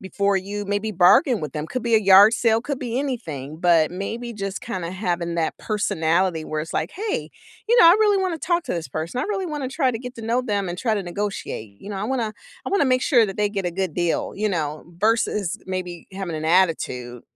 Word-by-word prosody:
before 200 +1 0
you, 205 +2 -4
maybe, 205 +2 -1
bargain 200 - +5
with 150 -3 -5
them, 150 0 -4
could 235 +9 -4
be 235 -1 +1
a 220 - +7
yard 200 +2 +7
sale, 225 -1 +2
could 275 +2 -4
be 240 -1 -4
anything, 155 - -4
but, 170 -3 +4
maybe, 230 +6 -5
just 195 -1 -4
kinda 185 -7 -4
having 175 -3 -2
that 160 -1 -1
personality 180 -5 0
where 155 0 -3
it's 160 +2 -6
like, 160 - -1
"Hey, 420 +3 -3 0.4
you 475 0 +6
know, 335 - +9
I 340 - +9
really 415 -2 +4
wanna 370 -4 -1
talk 345 +2 0
to - - -3
this 165 -2 -4
person. 165 +9 -4
I - - -1
really 390 -3 -2
want 295 -4 -4
to - - -2
try 265 -5 +2
to 225 - -4
get 250 +1 -8
to 230 - -8
know 235 +3 +1
them 200 -5 -1
and 175 +1 -5
try 225 -3 +1
to 205 - -2
negotiate." 175 - -5
You 205 - -9
know, 200 - -4
I 200 - -3
wanna 230 -3 -1 0.3
I - - -2
wanna 390 -7 +3
make 255 -1 +2
sure 240 -7 +4
that 195 - -6
they 210 0 +2
get 195 -3 -3
a 175 - 0
good 185 -3 -2
deal, 175 -2 -1
you 215 +1 0
know, 155 -4 -3
versus, 210 -4 +1
maybe 180 -2 -5
having 190 -4 -4
an 155 - -5
attitude 155 -9 +1
200 Hz, 240 wpm, -23 LUFS, 175-235 Hz, 0.4 s, know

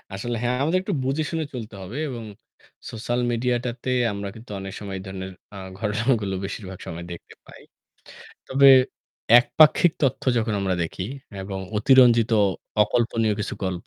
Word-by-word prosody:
আসলে 120 +4 -3
হ্যাঁ, 125 +1 0
আমাদের 165 +5 +2
একটু 200 - -2
বুঝে 135 +4 0
শুনে 160 -1 -2
চলতে 110 -4 -7
হবে 100 +9 -7
এবং 120 -3 -6 0.7
সোশ্যাল 120 +2 -2
মিডিয়াটাতে 120 +1 -2 0.2
আমরা 100 0 -5
কিন্তু 110 0 -12
অনেক 95 0 -7
সময় 100 -2 -6
এ - - -8
ধরনের 95 0 -6 0.2
অ্যাঁ 95 -2 -8
ঘটনাগুলো 105 -1 0
বেশিরভাগ 95 -1 -7
সময় 85 +1 -6
দেখতে 85 - -10
পাই। - - -14 0.9
তবে 140 +1 +6 0.7
একপাক্ষিক 150 +7 +4
তথ্য 135 -2 +1
যখন 110 -1 0
আমরা 95 -1 0
দেখি 85 +2 -4 0.4
এবং 95 0 -5 0.2
অতিরঞ্জিত 120 -1 +5 0.5
অকল্পনীয় 115 -1 +1
কিছু 105 - -3
গল্প, 90 -1 -4
115 Hz, 145 wpm, -24 LUFS, 95-125 Hz, 0.9 s, তবে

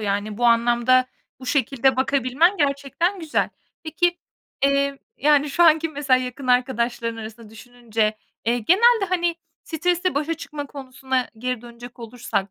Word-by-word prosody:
Yani, 205 +1 -2
bu 240 - -1
anlamda, 240 +2 +3 0.3
bu 255 - -10
şekilde 265 -1 +1
bakabilmen 270 - +2
gerçekten 290 +6 -1
güzel. 320 -2 0 0.3
Peki, 345 +2 0 0.5
eee, 280 0 +1 0.2
yani, 295 0 +3
şu 345 +5 +2
anki 325 0 +5
mesela 280 -4 +1
yakın 255 +1 -6
arkadaşların 240 -2 0
arasında 220 0 -10
düşününce, 225 -2 -3 0.3
eee, 235 +2 +1
genelde, 415 - +4
hani, 345 -2 0 0.3
stresle 355 +2 -1
başa 305 +3 -1
çıkma 290 -2 -7
konusuna 260 -2 -4
geri 250 0 -3
dönecek 240 +1 -12
olursak, 225 -4 -4
260 Hz, 135 wpm, -22 LUFS, 240-305 Hz, 0.5 s, anki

